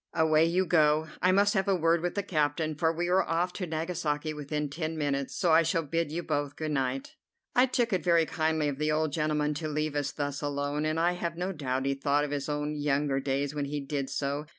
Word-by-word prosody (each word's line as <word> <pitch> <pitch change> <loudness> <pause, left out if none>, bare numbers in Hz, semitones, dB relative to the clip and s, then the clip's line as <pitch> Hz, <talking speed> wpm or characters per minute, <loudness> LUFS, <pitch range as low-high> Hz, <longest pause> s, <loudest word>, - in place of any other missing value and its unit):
Away 160 0 +4
you 180 +3 +1
go. 155 -2 +3
I 185 - +4
must 200 +2 +4
have 195 -1 +1
a 195 - +3
word 165 -1 +2
with 175 0 -2
the 200 - -1
captain, 155 -2 0
for 160 +2 +1
we 170 +1 -2
are 185 +2 +4
off 175 +1 -1
to 180 - -4
Nagasaki 155 -2 -2
within 150 0 -3
ten 160 +2 -4
minutes, 140 -2 -1
so 175 -4 +2
I 160 +1 +7
shall 165 0 0
bid 165 +1 -1
you 170 +2 -3
both 145 -3 -2
good 155 -1 -3
night." 135 -1 -2 0.4
I 250 +1 +5
took 245 -3 0
it 180 -4 0
very 170 -1 +4
kindly 160 -1 0
of 140 -1 -3
the 150 0 +1
old 155 -1 0
gentleman 150 -1 0
to 155 +2 -4
leave 150 0 -2
us 145 -1 -1
thus 145 -1 -3
alone, 145 +1 -2
and 155 +1 0
I 170 +1 +3
have 170 -1 -4
no 180 +2 -2
doubt 135 -5 -2
he 140 - +1
thought 140 +1 +1
of 145 - -3
his 145 0 -3
own 150 0 -2
younger 145 -1 0
days 140 +1 -1
when 145 -1 -2
he 145 +1 -3
did 140 -1 -3
so. 140 +2 -2
155 Hz, 240 wpm, -29 LUFS, 145-165 Hz, 0.4 s, I